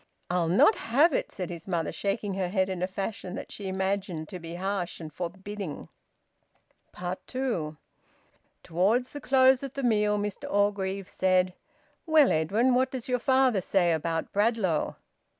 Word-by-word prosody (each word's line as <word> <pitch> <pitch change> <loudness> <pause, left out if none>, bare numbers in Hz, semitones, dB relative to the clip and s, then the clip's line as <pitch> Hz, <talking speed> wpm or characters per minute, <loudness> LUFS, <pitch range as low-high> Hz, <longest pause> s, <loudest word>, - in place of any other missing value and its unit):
"I'll 180 -2 +1
not 185 - +6
have 290 +3 +3
it!" - - -1
said 180 -3 -5
his 170 0 -8
mother, 170 -4 -1
shaking 200 0 -2
her 185 -2 -1
head 190 0 +1
in 185 -2 -3
a 185 - +1
fashion 195 0 -5
that - - -7
she 200 - -6
imagined 190 -4 -2
to 185 - -7
be 165 0 -7
harsh 190 -1 -3
and 155 -3 -8
forbidding. 190 0 -6 1.4
TWO. 225 - -2 0.9
Towards 205 +10 +1
the 290 - -7
close 260 0 +5
of 275 -2 -7
the 275 - -3
meal, 210 -3 +2
Mr 205 0 -4
Orgreave 200 -1 0
said 185 -1 +2 0.5
"Well, 310 -4 +6
Edwin, 205 +11 +2
what 255 +2 +3
does 260 -3 -6
your 250 -1 +1
father 260 -5 +3
say 175 -1 +2
about 165 0 -2
Bradlaugh?" 205 -6 +1
195 Hz, 155 wpm, -28 LUFS, 180-235 Hz, 1.4 s, not